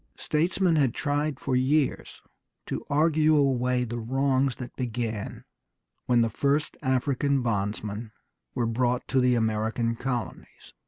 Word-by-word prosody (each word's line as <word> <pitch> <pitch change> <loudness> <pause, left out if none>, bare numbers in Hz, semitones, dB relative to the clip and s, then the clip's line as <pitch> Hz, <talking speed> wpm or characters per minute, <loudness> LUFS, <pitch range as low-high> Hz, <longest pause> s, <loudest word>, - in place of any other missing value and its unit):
Statesmen 170 +2 +1
had 135 -6 +2
tried 145 -1 -1
for 140 -6 -1
years 135 +3 0 0.4
to - - -4
argue 155 +1 +3
away 125 -3 +2
the 120 0 -4
wrongs 135 +2 +1
that 125 - -8
began 115 -4 -4 0.6
when 120 -1 +4
the 115 - +2
first 140 +6 0
African 135 0 +1
bondsmen 105 0 -2 0.4
were 120 - 0
brought 120 +2 0
to 135 - +2
the 125 -1 +3
American 110 +1 0
colonies. 125 -1 -5
125 Hz, 125 wpm, -27 LUFS, 115-140 Hz, 0.6 s, when